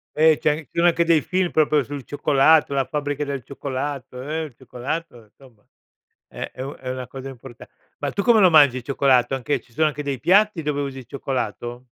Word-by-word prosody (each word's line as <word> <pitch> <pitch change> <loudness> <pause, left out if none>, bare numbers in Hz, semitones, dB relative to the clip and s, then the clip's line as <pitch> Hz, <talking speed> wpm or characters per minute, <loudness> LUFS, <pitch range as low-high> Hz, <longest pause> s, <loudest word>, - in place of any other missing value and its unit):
Eh, 155 0 +5
c'è 150 0 +2
ci 155 -6 -11
sono 170 +1 +3
anche 170 0 +2
dei 165 -3 +4
film 185 -1 -1
proprio 150 -2 +3
sul 140 0 -7
cioccolato, 145 +2 +3
"La 135 -1 +1
fabbrica 145 +1 -3
del 140 -3 -4
cioccolato", 135 -1 -5
eh, 155 +4 -3
il 145 -6 -9
cioccolato, 130 +1 -6
insomma 110 0 -22 0.6
è - - -7
è 130 - -9
u 140 +2 -6
è 130 - -8
una 130 0 -4
cosa 135 +2 -8
importa 130 -2 -12 0.3
ma - - -2
tu 200 - -2
come 235 0 +5
lo 185 -3 +7
mangi 145 -5 +6
il 125 - -6
cioccolato, 135 -1 +2
anche 135 +2 -1
ci 120 - -27
sono 155 +5 +2
anche 150 -1 -4
dei 140 -3 -3
piatti 200 -2 +3
dove 145 -1 -1
usi 135 -1 -5
il 125 - -12
cioccolato? 120 -2 -4
140 Hz, 210 wpm, -22 LUFS, 130-155 Hz, 0.6 s, lo